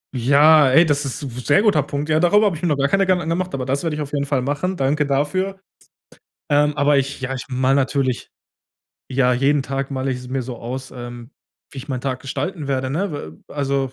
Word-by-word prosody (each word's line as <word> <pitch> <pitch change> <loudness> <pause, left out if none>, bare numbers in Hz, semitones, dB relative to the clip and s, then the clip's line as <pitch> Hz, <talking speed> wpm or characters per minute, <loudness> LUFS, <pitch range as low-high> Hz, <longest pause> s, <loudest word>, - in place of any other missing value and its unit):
Ja, 145 +4 +5
ey, 160 +7 +6
das 145 -1 +1
ist 135 - -4
sehr 140 +4 +1
guter 175 -10 +3
Punkt. 145 +1 -4
Ja, 155 - +3
darüber 205 +5 +4
habe 195 - +1
ich 155 - -9
mir 175 - 0
noch 150 - +1
gar 140 0 +2
keine 195 +5 +2
Gedanken 185 -3 +2
angemacht, 175 +3 -2
aber 130 -2 -3
das 135 +4 -1
werde 160 -2 -1
ich 150 - -4
auf 145 -1 -6
jeden 140 -1 0
Fall 135 -2 0
machen. 145 +8 -2
Danke 145 +2 +1
dafür. 185 +8 -1 0.9
Ähm, 150 0 +3
aber 145 0 +3
ich 135 0 -3
ja, 130 0 -3
ich 130 - -5
mal 130 +1 +1
natürlich 135 -2 -1 0.8
ja, 125 -1 +2
jeden 135 +3 +2
Tag 135 +1 -4
male 130 0 -2
ich's 125 0 -5
mir 130 0 -2
so 125 0 -7
aus, 130 +3 -6
ähm, 120 -1 -9 0.4
wie 140 - -9
ich 135 +2 -9
meinen 130 -3 -3
Tag 130 -1 -3
gestalten 145 +4 -4
werde, 130 -1 -1
ne? 180 +4 -2
W 80 - -7
also, 140 -2 -2
140 Hz, 225 wpm, -21 LUFS, 130-150 Hz, 0.9 s, ey